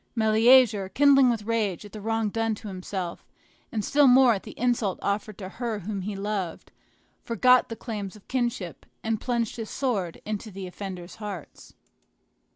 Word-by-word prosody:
Meleager, 220 -2 +5
kindling 275 +3 +5
with 230 -3 -1
rage 210 -4 -1
at 205 - -11
the 215 - -8
wrong 225 0 0
done 225 +1 -1
to 210 - -10
himself, 185 -2 -5 0.5
and 215 -3 -2
still 290 -1 +5
more 255 -1 +7
at 195 - -3
the - - -11
insult 235 -5 +1
offered 205 0 -2
to 190 - -6
her 225 +2 -4
whom 200 +1 -4
he 200 +2 -4
loved, 195 -4 -4 0.5
forgot 250 +2 +4
the 230 - -4
claims 210 -4 -6
of 210 - -17
kindred, 240 -9 -3 0.2
and 220 -1 -1
plunged 235 -3 -1
his 225 -2 -5
sword 205 -11 -2
into 215 +1 -4
the 195 -1 -7
offenders' 180 0 -7
hearts. 205 -7 -8
215 Hz, 165 wpm, -26 LUFS, 195-235 Hz, 0.5 s, more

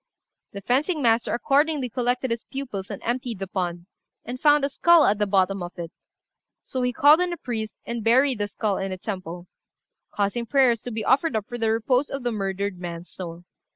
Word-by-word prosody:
The 200 - -6
fencing 280 - +1
master 230 0 +2
accordingly 280 +2 +1
collected 245 +1 -1
his 230 0 -2
pupils 245 -8 -6
and 200 - -7
emptied 240 -1 -2
the 195 - -4
pond, 175 -2 -3 0.4
and 245 +2 -6
found 295 -1 +4
a - - -1
skull 340 +3 +5
at 205 +1 +2
the 210 - +1
bottom 195 0 +2
of 175 0 -6
it; 170 -1 -6 0.7
so 260 - -4
he 250 0 +1
called 290 +6 +6
in 360 0 0
a 345 - -4
priest, 220 -6 -4
and 235 -1 -4
buried 255 +2 +3
the 205 - 0
skull 205 0 -2
in 195 0 -3
a 185 - -4
temple, 180 -3 -6 0.6
causing 210 +4 -2
prayers 255 -5 +3
to 245 - -6
be 220 -1 -4
offered 275 +1 +2
up 215 -2 -1
for 240 - -6
the 225 -1 +1
repose 250 +5 +1
of 275 -2 -5
the 240 - 0
murdered 195 -2 -3
man's 175 -1 -7
soul. 170 -2 -8
230 Hz, 205 wpm, -24 LUFS, 195-260 Hz, 0.7 s, called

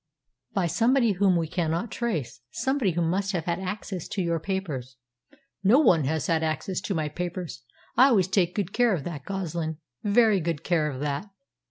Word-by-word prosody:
"By 190 -3 +2
somebody 235 - +3
whom 190 -1 +3
we 165 -1 0
cannot 165 +5 -1
trace 155 - -3
somebody 265 - 0
who 170 +1 0
must 195 +4 0
have 170 -3 -2
had 170 0 -1
access 190 -2 -5
to 195 - -2
your 170 -1 0
papers." 150 -9 -4 0.7
"No 210 +7 +6
one 175 - +4
has 155 +2 -1
had 165 -2 +1
access 160 +4 -2
to 195 - -2
my 155 -2 0
papers. 175 +1 -5 0.3
I 260 - +7
always 200 -9 +3
take 185 -2 +1
good 200 -3 -2
care 240 -5 +3
of 150 - -5
that, 150 -4 -6
Goslin 170 -5 -3 0.3
very 210 -1 +4
good 165 -3 -2
care 160 -4 +1
of 135 -2 -6
that. 150 +7 -2
175 Hz, 185 wpm, -26 LUFS, 160-200 Hz, 0.7 s, I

